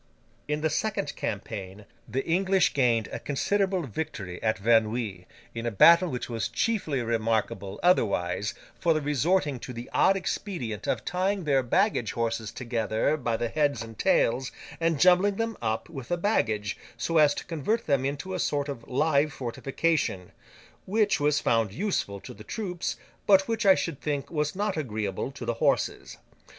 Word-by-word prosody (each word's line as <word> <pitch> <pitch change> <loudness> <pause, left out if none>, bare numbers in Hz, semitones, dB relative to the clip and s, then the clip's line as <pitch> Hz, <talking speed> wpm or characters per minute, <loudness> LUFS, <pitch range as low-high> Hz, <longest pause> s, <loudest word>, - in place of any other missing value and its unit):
In 150 +1 -1
the 155 - +1
second 215 +7 -1
campaign, 95 +2 -5 0.2
the 130 +4 -2
English 190 +2 +2
gained 120 -5 +2
a - - -4
considerable 190 +5 0
victory 110 - -5
at 110 0 +1
Verneuil, 110 -3 +1 0.3
in 115 0 -4
a - - +2
battle 170 - +6
which 125 -4 -4
was 115 -2 -2
chiefly 160 - -1
remarkable, 110 -3 -1
otherwise, 105 - +2 0.2
for 170 - +3
their 155 - -1
resorting 150 0 +1
to 125 - -7
the 120 +1 -8
odd 195 - +4
expedient 170 - -4
of - - -1
tying 190 +2 0
their 140 -3 +3
baggage 125 - +1
horses 115 -2 -2
together 115 +2 0
by 120 -6 -1
the 120 - -1
heads 145 -2 0
and 115 -1 -11
tails, 125 +3 +2 0.3
and 165 -3 +1
jumbling 185 +4 +5
them 225 +1 -2
up 110 -1 -1
with 135 -7 -8
the 175 - 0
baggage, 110 - 0 0.2
so 165 -1 +1
as 150 -1 +5
to - - -6
convert 185 +8 -1
them 140 -3 +2
into 145 +7 -3
a 185 - -2
sort 145 -2 0
of 125 -5 -6
live 145 +2 +2
fortification—which 155 - -2
was 145 0 +2
found 115 -3 +1
useful 155 - -2
to - - -10
the 105 - -12
troops, 180 - -3 0.3
but 195 -1 +6
which 225 -2 0
I 190 - +8
should 165 -7 -3
think 145 -2 -3
was 150 -1 -1
not 205 -2 -1
agreeable 110 -7 -2
to 130 -3 -7
the 120 - 0
horses. - - 0
140 Hz, 165 wpm, -27 LUFS, 115-180 Hz, 0.3 s, I